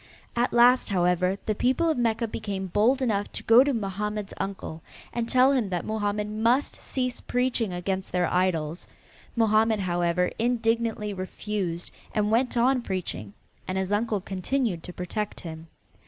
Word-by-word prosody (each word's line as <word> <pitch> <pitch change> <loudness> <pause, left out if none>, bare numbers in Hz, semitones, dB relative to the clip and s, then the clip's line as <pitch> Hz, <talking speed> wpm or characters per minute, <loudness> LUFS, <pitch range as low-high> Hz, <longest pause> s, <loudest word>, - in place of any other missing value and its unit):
At 240 +1 +1
last, 245 +1 +5
however, 180 0 +2
the 215 - +1
people 260 +10 +1
of 320 - +2
Mecca 230 -1 +1
became 205 -3 -4
bold 225 +8 +2
enough 205 -4 0
to - - -4
go 230 +3 +7
to 285 - +1
Mohammed's 210 -2 -3
uncle 190 -4 -5 0.3
and 235 -1 -2
tell 255 +1 +5
him 250 -7 +1
that 175 -3 -2
Mohammed 210 -1 -1
must 230 +6 +1
cease 255 -2 -3
preaching 245 -4 0
against 190 +2 -3
their 180 0 +2
idols. 175 -3 0 0.5
Mohammed, 220 -1 +3
however, 175 -1 +1
indignantly 230 -2 0
refused, 185 -2 -4 0.2
and 210 -1 +1
went 245 +2 +2
on 250 +2 +3
preaching, 180 - -4 0.3
and 185 - -2
his 190 0 -1
uncle 210 -1 0
continued 195 +1 -1
to 180 - -6
protect 190 +4 -4
him. 160 -1 -8
210 Hz, 155 wpm, -26 LUFS, 185-235 Hz, 0.5 s, go